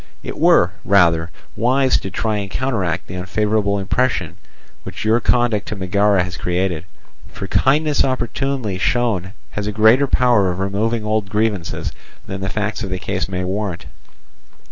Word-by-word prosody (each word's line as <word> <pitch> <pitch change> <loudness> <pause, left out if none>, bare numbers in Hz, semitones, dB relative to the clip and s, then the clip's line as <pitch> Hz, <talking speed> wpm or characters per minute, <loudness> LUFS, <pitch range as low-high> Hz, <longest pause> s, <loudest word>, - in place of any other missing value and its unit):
It - - -6
were, 90 - +4
rather, 85 -4 +3 0.3
wise 130 +3 +2
to 95 - -6
try 110 +3 -1
and 100 -1 -4
counteract 110 -9 -1
the - - -9
unfavourable 100 +2 0
impression 120 +6 -1 0.4
which - - -7
your 110 +2 +4
conduct 120 -3 +1
to - - -4
Megara 100 0 +2
has 90 -2 -6
created. 90 -2 -1 0.5
For - - -6
kindness 150 +2 +2
opportunely 130 -4 -2
shown 100 -5 0 0.2
has 105 0 -4
a - - -1
greater 110 +6 +5
power 120 -8 +3
of 90 - -3
removing 105 +4 -1
old 110 -2 -1
grievances 105 -4 -1 0.3
than 95 0 -6
the 95 - -2
facts 105 +3 -2
of 100 - -4
the 95 - -2
case 95 0 -3
may 90 -1 -2
warrant. 95 -1 -3
105 Hz, 155 wpm, -19 LUFS, 95-115 Hz, 0.5 s, greater